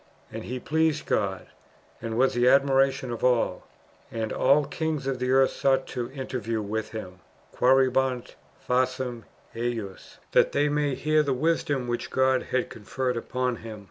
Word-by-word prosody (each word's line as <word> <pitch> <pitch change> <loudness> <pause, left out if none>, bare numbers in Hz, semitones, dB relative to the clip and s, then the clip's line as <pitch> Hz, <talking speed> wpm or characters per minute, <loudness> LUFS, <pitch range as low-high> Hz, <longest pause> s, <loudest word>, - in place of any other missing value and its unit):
^ - - -30 0.3
And - - -6
he 125 +1 -4
pleased 160 +2 0
God, 95 -2 -1 0.6
and 115 -1 -4
was 130 +2 +3
the 120 0 +2
admiration 135 -1 +3
of 120 - -5
all; 125 -2 +1 0.4
and 110 -1 -3
all 145 +1 +3
kings 155 0 -3
of 135 -2 -2
the 125 0 -1
earth 135 0 +4
sought 135 0 0
an 120 -1 -3
interview 125 -4 -3
with 110 +1 -3
him 95 -5 -8 0.4
(qucerebant 130 -1 +2 0.3
faciem 125 -1 0 0.3
ejus), 115 -5 -5
that - - +3
they 145 +1 +2
might 145 -2 0
hear 155 +1 +2
the 140 -2 0
wisdom 145 -3 0
which 120 0 -3
God 130 0 +2
had 130 -1 -1
conferred 125 +4 -3
upon 125 +1 -2
him."" 110 -1 -8
130 Hz, 160 wpm, -26 LUFS, 120-135 Hz, 0.6 s, earth